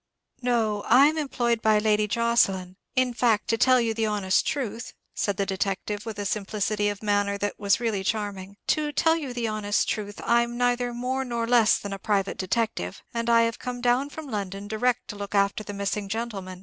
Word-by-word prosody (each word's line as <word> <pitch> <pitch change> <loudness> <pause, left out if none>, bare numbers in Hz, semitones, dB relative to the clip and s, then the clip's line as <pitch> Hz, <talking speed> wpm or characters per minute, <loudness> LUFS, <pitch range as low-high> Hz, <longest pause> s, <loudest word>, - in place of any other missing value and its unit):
"No, 225 -4 0
I'm 280 +6 +6
employed 240 -5 0
by 215 -1 +4
Lady 210 0 +2
Jocelyn; 200 -5 +1 0.2
in 255 -1 +2
fact, 230 -3 +2
to 230 - +3
tell 255 +1 +5
you 230 -2 0
the 220 0 0
honest 200 -3 +1
truth," 235 -4 -3 0.2
said 200 -2 -1
the 200 - 0
detective, 200 +3 -3
with 220 -2 -5
a 205 - -3
simplicity 210 +1 -1
of 205 +1 -6
manner 205 -1 +1
that 205 0 -3
was 200 0 +2
really 220 -5 -1
charming: 200 -2 -3
"to 305 -1 +1
tell 320 +2 +3
you 295 -6 -4
the 240 -2 -2
honest 210 -1 0
truth, 205 -1 -3
I'm 235 0 +2
neither 245 0 +1
more 250 +2 -2
nor 235 -2 -2
less 235 -2 +4
than 200 -1 -6
a 195 - -6
private 200 -1 -1
detective, 185 - -2
and 235 0 -2
I 230 0 +6
have 230 0 -1
come 250 -1 -5
down 245 +3 +2
from 315 +1 -8
London 200 -5 -4
direct 240 +3 0
to 210 - -5
look 205 0 -5
after 200 +1 +2
the 205 - -7
missing 200 0 -3
gentleman. 195 -5 -4
215 Hz, 200 wpm, -26 LUFS, 200-240 Hz, 0.2 s, I'm